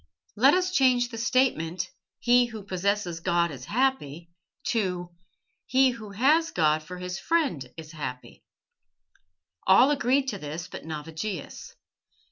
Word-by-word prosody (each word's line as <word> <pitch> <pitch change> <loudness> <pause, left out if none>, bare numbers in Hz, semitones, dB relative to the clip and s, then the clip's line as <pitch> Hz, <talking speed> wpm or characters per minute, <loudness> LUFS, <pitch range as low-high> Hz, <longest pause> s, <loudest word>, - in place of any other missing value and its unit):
Let 265 +9 +5
us 365 0 +1
change 255 -7 +3
the 230 -2 -7
statement, 225 -9 0 0.3
'He 245 +1 +4
who 220 -3 -8
possesses 190 -2 -1
God 170 -1 +1
is 130 -3 -9
happy' 175 - -1 0.4
to 180 -6 -1 0.6
'He 265 0 +4
who 225 -3 -9
has 290 +11 +3
God 155 -2 +2
for 180 +4 -9
his 180 0 -5
friend 265 - 0
is 160 -1 -9
happy.'" 130 -6 -7 1.2
All 245 +9 +6
agreed 270 -1 +2
to 205 - -5
this 155 +3 -6
but - - -9
Navigius. 160 +3 -6
200 Hz, 130 wpm, -26 LUFS, 165-255 Hz, 1.2 s, All